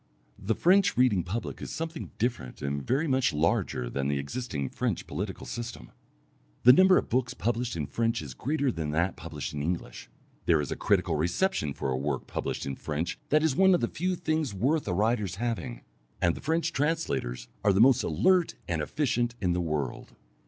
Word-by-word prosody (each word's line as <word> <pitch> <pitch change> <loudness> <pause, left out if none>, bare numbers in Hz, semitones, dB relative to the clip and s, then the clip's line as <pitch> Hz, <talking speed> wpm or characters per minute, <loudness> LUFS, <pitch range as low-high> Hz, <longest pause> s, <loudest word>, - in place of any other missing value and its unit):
The 105 +2 -1
French 185 +1 +4
reading 125 -7 +4
public 105 +7 -4
is - - -5
something 165 0 -5
different 115 - -2
and 70 +1 -1
very 135 - 0
much 130 - +2
larger 75 -5 0
than 70 +2 -2
the 70 0 0
existing 70 - -3
French - - -2
political - - -5
system. 120 - -6 0.7
The 125 - +10
number 185 +5 +6
of - - 0
books 125 +1 0
published 115 +6 -1
in 75 -3 -2
French 115 - 0
is 70 -5 -7
greater 140 - 0
than 80 -7 -3
that 85 +4 +1
published 75 -4 -6
in 75 - -3
English; 85 +4 -4 0.4
there 85 -3 +5
is 75 - -3
a - - -1
critical - - +1
reception 85 - 0
for 65 - -2
a 65 - 0
work 70 0 -2
published - - -3
in 70 -1 -4
French 80 +3 -3
that 155 +1 +4
is 155 -4 +2
one 190 +1 +6
of - - +1
the 115 - +1
few 180 +7 -1
things 155 - -1
worth 140 +9 +1
a 90 - 0
writer's 105 -2 +1
having, 120 +2 -3 0.4
and 85 -1 +3
the - - -8
French 165 +2 0
translators 140 - -1 0.2
are 100 - +5
the 95 - +2
most 130 +2 +6
alert 170 - +2
and 85 -3 -1
efficient 120 - 0
in 90 -3 +1
the 90 - 0
world. 75 -6 -3
110 Hz, 195 wpm, -28 LUFS, -, 0.7 s, The